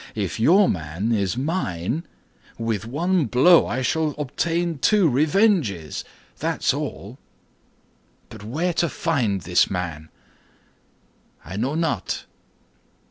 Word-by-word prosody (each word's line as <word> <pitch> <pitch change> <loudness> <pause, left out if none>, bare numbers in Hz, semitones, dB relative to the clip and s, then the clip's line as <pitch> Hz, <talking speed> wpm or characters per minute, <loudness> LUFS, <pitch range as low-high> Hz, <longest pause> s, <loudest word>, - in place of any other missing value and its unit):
If 100 -4 -3
your 185 - +5
man 85 +7 -2
is 100 -1 0
mine, 135 - -2 0.5
with 115 -2 -2
one 170 +6 +1
blow 130 +9 +5
I 130 +2 -2
shall 155 +3 0
obtain 165 +3 -1
two 205 +3 +4
revenges, 145 - +1 0.4
that's - - 0
all; - - -6 1.1
but - - -11
where 160 +11 -1
to 170 0 +1
find 130 - -1
this 90 +2 +2
man?" 80 -4 -4 1.4
"I 85 +5 -7
know 125 +8 -1
not." 160 - -2
130 Hz, 110 wpm, -23 LUFS, 100-165 Hz, 1.4 s, your